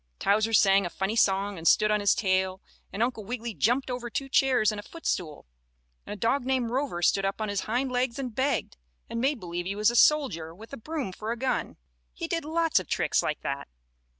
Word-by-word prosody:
Towser 215 +3 +2
sang 200 -2 +5
a 175 - -3
funny 195 +5 -2
song 200 -3 +2
and 165 - -2
stood 215 0 +5
on 210 - +2
his 205 -1 +3
tail, 190 -1 0 0.3
and 215 - 0
Uncle 240 -3 -2
Wiggily 235 +1 -5
jumped 250 +6 +1
over 245 -1 -4
two 270 +3 -4
chairs 260 -5 +3
and 210 - -5
a - - -4
footstool, 180 - -4 0.6
and - - -5
a - - -7
dog 235 +6 +1
named 255 -2 0
Rover 255 -9 -2
stood 195 - +3
up 195 +2 -2
on 215 -1 -2
his 205 -1 -2
hind 255 +3 0
legs 250 0 0
and 255 -4 -4
begged, 265 - -1 0.3
and 230 - -2
made 270 0 +1
believe 175 -1 -5
he 200 - -2
was 210 +2 +3
a - - -5
soldier 200 - +3
with 225 +7 -13
a - - -5
broom 295 -3 -4
for 215 +4 -5
a 235 - -3
gun, 260 +2 -2 0.4
and - - -3
did 330 -2 -1
lots 325 +1 +2
of - - -8
tricks - - +1
like 150 - -3
that. 140 0 -4
225 Hz, 225 wpm, -27 LUFS, 195-260 Hz, 0.6 s, sang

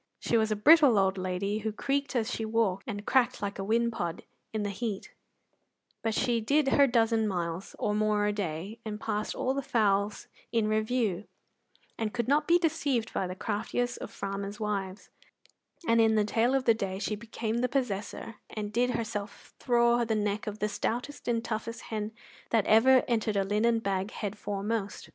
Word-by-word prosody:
She - - 0
was 220 -1 +2
a - - +2
brittle 285 +1 +6
old 195 -1 +2
lady 185 +3 -1
who 220 0 -2
creaked 280 +5 -2
as 235 0 0
she 225 - -3
walked, 220 -4 0
and 205 -3 -5
cracked 260 -3 +2
like 200 -1 -4
a - - -2
whin 235 +3 +1
pod 175 -6 -4 0.3
in 215 -1 -2
the 205 - -2
heat, 200 0 -4 0.9
but 225 -1 -1
she 235 -2 +1
did 280 +5 +2
her 280 +1 +5
dozen 225 -2 +2
miles 175 -1 -3
or 210 - 0
more 210 0 +2
a 210 - +1
day, 195 +2 -4
and 215 -1 -5
passed 210 0 -2
all 260 - 0
the 275 - -1
fowls 205 -4 +1 0.3
in 225 -2 +2
review, 215 -2 0 0.7
and 220 0 -2
could 235 -2 -1
not 295 +3 +2
be 345 - +6
deceived 280 -8 0
by 190 - -1
the 185 - -5
craftiest 235 +4 -2
of - - -6
farmers' 200 +1 -5
wives; 200 -3 -3 0.8
and 230 0 +5
in 220 -1 +4
the 210 -1 +3
tail 235 +5 +2
of 265 -1 0
the 230 - +6
day 195 -3 -3
she 210 +2 -2
became 225 +1 -3
possessor, 225 -3 -3
and 210 -1 -5
did 245 +2 +2
herself 215 -2 -5
thraw 240 -1 +3
the 225 -1 0
neck 210 0 -1
of 210 0 -4
the 210 - 0
stoutest 235 +6 -3
and 230 -1 0
toughest 230 +1 -4
hen 215 -1 -2 0.4
that 225 -3 +2
ever 250 +4 +6
entered 220 -3 0
a 195 - +3
linen 215 +4 +2
bag 195 -2 -1
head 205 -2 -4
foremost. 205 0 -3
220 Hz, 185 wpm, -29 LUFS, 205-235 Hz, 0.9 s, brittle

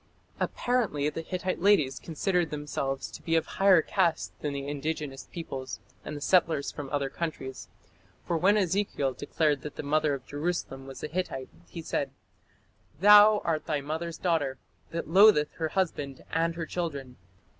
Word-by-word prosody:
Apparently 195 - 0
the 165 - -4
Hittite 185 +1 -3
ladies 150 -10 +3
considered 175 +1 0
themselves 145 -2 -3
to - - -9
be 165 - 0
of 165 - +2
higher 190 -4 +4
caste 175 -5 0
than 150 - -2
the 140 0 -4
indigenous 145 -1 -4
peoples 135 -6 -6 0.2
and 150 - -6
the - - -9
settlers 165 -4 +2
from 145 -2 -7
other 145 -1 0
countries, 135 - -5 0.6
for 170 - -1
when 190 +6 +4
Ezekiel 185 -8 0
declared 145 +2 0
that 150 - -7
the - - -5
mother 150 0 +2
of 130 -1 -10
Jerusalem 145 -3 -3
was 135 - -9
a - - -1
Hittite 150 -5 -3 0.2
he 165 - -7
said: - - -1 0.9
"Thou 210 +2 +8
art 155 -3 -1
thy 150 -3 0
mother's 160 +4 -4
daughter, 150 -7 0 0.3
that 170 - -4
lotheth 185 -4 +6
her 160 - 0
husband 145 -7 -2
and 165 0 +1
her 165 -1 -3
children." 145 -8 -4
160 Hz, 160 wpm, -28 LUFS, 140-175 Hz, 0.9 s, Thou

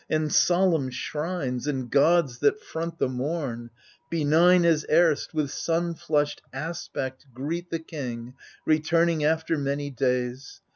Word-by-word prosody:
And 155 -1 0
solemn 175 -6 +3
shrines, 150 0 -3
and 130 -4 -2
gods 140 -1 +3
that 145 +9 +2
front 165 -3 -5
the - - +1
mom 130 -2 -3
I 120 - -38 0.3
Benign 170 +3 +4
as 160 -3 +3
erst, 160 -2 +3
with 150 -3 0
sun 170 +1 -1
flushed 150 -2 -1
aspect 135 -3 -5
greet 165 +7 -4
The 165 - -1
king 125 -7 -6 0.3
returning 160 +1 +2
after 160 +1 +1
many 140 +1 -2
days. 125 0 -2
150 Hz, 135 wpm, -26 LUFS, 135-165 Hz, 0.3 s, Benign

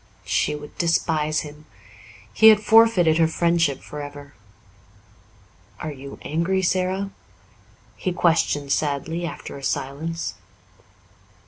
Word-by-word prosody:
She 150 - 0
would 150 0 -10
despise 155 -2 +1
him. 150 0 -11 0.7
He 220 - +6
had 215 -1 +6
forfeited 210 -7 +4
her 165 - +5
friendship 170 -4 +1
for 150 - -7
ever. 145 0 -10 1.5
"Are 155 - -4
you 140 0 -10
angry, 170 +5 0
Sara?" 185 +2 0 0.9
he 185 - -2
questioned 160 -5 +1
sadly, 160 +4 -1
after 165 - -8
a - - -14
silence. 145 +4 -3
160 Hz, 110 wpm, -23 LUFS, 145-175 Hz, 1.5 s, He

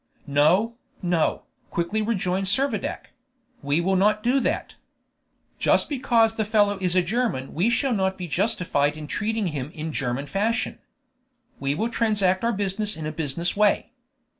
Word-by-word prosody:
"No, 165 +11 +3 0.3
no," 175 -3 +1 0.3
quickly 170 +6 -1
rejoined 195 -3 -1
Servadac; 235 0 -1 0.5
"we 145 +3 +1
will 190 +2 +1
not 210 +3 +3
do 255 +3 +3
that. - - -2 0.9
Just - - +3
because 240 -5 +2
the 220 - +2
fellow 205 -2 +2
is 180 -1 +1
a 185 - +4
German 205 - -1
we 180 +9 +2
shall 250 +2 +1
not 190 -2 0
be 180 -2 -5
justified 155 -6 +1
in 155 - -7
treating 215 +6 -1
him 140 -1 -4
in 155 0 -5
German 135 0 -2
fashion. 220 +7 -1 0.8
We 140 +1 -1
will 225 +8 -1
transact 210 -5 +1
our 235 - +2
business 205 0 -1
in 155 - -5
a 155 - -2
business 160 +2 -2
way. 210 +2 +2
195 Hz, 155 wpm, -24 LUFS, 160-220 Hz, 0.9 s, a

